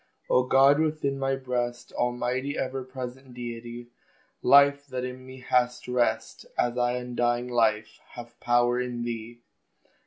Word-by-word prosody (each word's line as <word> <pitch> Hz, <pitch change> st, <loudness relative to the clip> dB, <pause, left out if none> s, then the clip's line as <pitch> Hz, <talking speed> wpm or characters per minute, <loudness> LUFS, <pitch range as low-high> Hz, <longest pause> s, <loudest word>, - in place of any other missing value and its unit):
O 125 Hz, -, +5 dB
God 135 Hz, +3 st, +5 dB
within 155 Hz, -3 st, 0 dB
my 135 Hz, 0 st, 0 dB
breast, 125 Hz, -2 st, -3 dB
Almighty, 125 Hz, +3 st, -1 dB
ever 130 Hz, 0 st, -3 dB
present 130 Hz, 0 st, -8 dB
Deity! 120 Hz, 0 st, -7 dB, 0.5 s
Life 140 Hz, 0 st, +5 dB
that 130 Hz, -1 st, -4 dB
in 125 Hz, 0 st, -7 dB
me 130 Hz, 0 st, -11 dB
has 125 Hz, -1 st, 0 dB
rest, 120 Hz, -3 st, -1 dB
As 120 Hz, 0 st, +1 dB
I 120 Hz, 0 st, +1 dB
undying 120 Hz, 0 st, -1 dB
Life 110 Hz, -3 st, +1 dB
have 120 Hz, -1 st, -11 dB
power 120 Hz, 0 st, +2 dB
in 120 Hz, -1 st, -4 dB
thee! 120 Hz, 0 st, -6 dB
125 Hz, 135 wpm, -27 LUFS, 120-130 Hz, 0.5 s, O